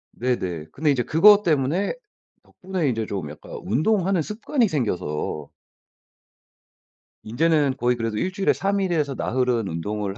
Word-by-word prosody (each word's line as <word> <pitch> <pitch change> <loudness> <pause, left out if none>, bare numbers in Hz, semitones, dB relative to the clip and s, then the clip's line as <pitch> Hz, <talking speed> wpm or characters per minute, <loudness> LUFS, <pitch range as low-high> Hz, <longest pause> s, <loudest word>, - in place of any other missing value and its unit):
네네. 95 -11 -2
근데 150 +1 +1
이제 130 -3 +1
그거 205 - +6
때문에 160 +3 +1 0.5
덕분에 185 -5 -3
인제 115 -3 -1
좀 95 -7 -4
약간 75 - -13
운동하는 180 - +1
습관이 230 - 0
생겨서 90 - -3 1.8
인제는 145 +3 +2
거의 125 -1 +1
그래도 115 -2 -3
1 185 +11 -1
주일에 195 +1 +2
3 200 0 -1
일에서 155 -7 0
나흘은 125 -4 0
운동을 100 +4 -4
135 Hz, 290 characters per minute, -23 LUFS, 110-180 Hz, 1.8 s, 그거